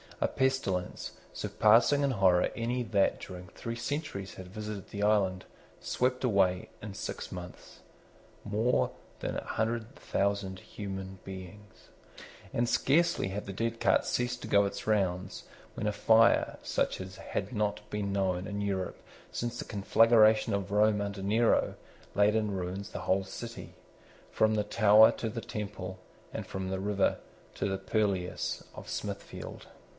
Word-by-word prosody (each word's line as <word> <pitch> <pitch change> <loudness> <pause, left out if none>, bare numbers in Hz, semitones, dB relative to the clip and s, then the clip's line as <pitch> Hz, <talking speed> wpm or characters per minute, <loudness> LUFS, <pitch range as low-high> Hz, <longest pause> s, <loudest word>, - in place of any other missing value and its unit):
A - - +2
pestilence, 130 -9 -1 0.2
surpassing 115 +7 +4
in 140 - +2
horror 95 -6 +4
any 120 +2 -1
that 100 -4 +2
during 90 -1 -8
three 115 +6 -6
centuries 120 -5 -4
had 95 - -9
visited 105 0 -6
the 100 - -5
island, 95 -3 +2 0.3
swept 125 +1 0
away, 95 -6 +2
in 105 -2 -6
six 95 - -5
mouths, 90 -1 -9 0.6
more 110 +4 +1 0.3
than - - -3
a - - -4
hundred 115 +3 -2
thousand 100 -7 -1
human 95 -2 -7
beings. 95 +2 -10 0.6
And 120 +1 +1
scarcely 170 - +3
had 100 +2 -4
the 100 - -4
dead 115 +3 -2
cart - - +3
ceased 120 0 -1
to - - -5
go 100 0 +5
its 100 - -4
rounds, 95 -3 0 0.3
when 105 - -3
a - - +2
fire, 110 +3 +4
such - - 0
as 95 0 -8
had 100 +4 -4
not 105 -1 -1
been 105 -1 -2
known 95 -2 0
in 100 0 -3
Europe 95 -2 -2 0.3
since 120 0 -3
the - - -5
conflagration 110 +1 +4
of 100 -1 -2
Rome 105 0 +4
under 100 -1 -4
Nero, 110 +4 +3 0.4
laid 105 +1 +4
in 105 -2 +1
ruins 95 +1 -4
the - - -6
whole 95 +1 +2
city, 115 +5 -8 0.6
from 110 0 +3
the 105 - +1
Tower 110 +1 +7
to 115 - -3
the 115 +2 -4
Temple, 95 -4 -5 0.3
and - - -5
from 95 0 -4
the 95 0 -2
river 100 0 +1 0.4
to - - -1
the 95 -1 -1
purlieus 95 -3 -1
of - - -9
Smithfield. - - -6
105 Hz, 150 wpm, -30 LUFS, 95-115 Hz, 0.6 s, Tower